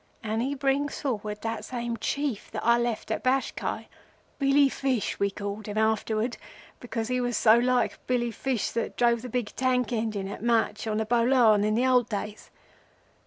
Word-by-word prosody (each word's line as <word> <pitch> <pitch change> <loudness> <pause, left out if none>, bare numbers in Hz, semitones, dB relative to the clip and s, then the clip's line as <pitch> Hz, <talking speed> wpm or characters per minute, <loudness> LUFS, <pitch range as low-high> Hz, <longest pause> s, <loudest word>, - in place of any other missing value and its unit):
and 220 +1 -1
he 275 +3 -1
brings 275 +1 0
forward 210 -6 -3
that 225 0 -3
same 240 -2 -3
Chief 280 -2 -2
that - - -5
I 235 0 +5
left 235 -2 -2
at - - -2
Bashkai—Billy 275 +2 0
Fish 265 -4 -1
we 200 - +2
called 205 +1 -6
him 210 0 -4
afterwards, 220 +1 0 0.4
because 225 -2 -4
he 250 0 0
was 245 -2 -1
so 220 -1 +6
like 250 +1 +1
Billy 240 -2 0
Fish 250 0 -2
that 230 - -3
drove 235 -1 +3
the 250 - -7
big 240 -3 -3
tank 255 -1 +1
engine 215 -4 -2
at 200 - -7
Mach 230 -1 +1
on 215 -1 -1
the 220 - 0
Bolan 230 -2 +4
in 215 0 +1
the 245 +3 +2
old 250 -3 +3
days. 210 0 -5
235 Hz, 175 wpm, -27 LUFS, 220-255 Hz, 0.4 s, so